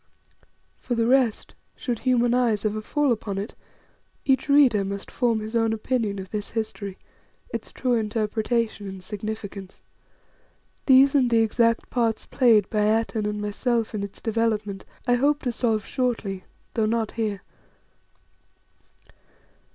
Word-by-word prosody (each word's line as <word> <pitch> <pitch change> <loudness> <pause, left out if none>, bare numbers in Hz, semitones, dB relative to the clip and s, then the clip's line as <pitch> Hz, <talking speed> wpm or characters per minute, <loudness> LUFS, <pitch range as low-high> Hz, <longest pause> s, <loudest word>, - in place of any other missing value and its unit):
For 245 - -2
the 230 -1 +1
rest, 250 -3 +2 0.2
should 240 -4 -3
human 245 -2 +2
eyes 230 -4 +1
ever 215 0 -1
fall 290 +5 +1
upon 210 -3 -2
it, 200 +3 -4 0.7
each 265 0 +2
reader 265 -8 +5
must 200 0 -5
form 235 -3 +1
his 220 +2 -6
own 225 -1 +2
opinion 220 -2 -1
of 190 -1 -7
this 210 -1 -3
history, 215 -3 -4 0.6
its - - -5
true 255 -2 -1
interpretation 220 0 -1
and 190 -1 -8
significance. 205 -1 -7 1.0
These 270 0 +7
and 265 -4 +4
the 230 -1 +4
exact 230 +1 +1
parts 230 -3 0
played 225 -6 +4
by 215 - +1 0.2
Atene 220 -2 -2
and 210 0 -3
myself 225 +3 -1
in 210 - -2
its 200 -1 -7
development 215 -3 -1 0.2
I 245 - +3
hope 285 +4 +2
to 250 - 0
solve 225 -3 0
shortly, 225 -7 -2 0.3
though 220 -2 +1
not 225 -1 0
here. 210 -4 -3
225 Hz, 140 wpm, -25 LUFS, 210-245 Hz, 1.0 s, These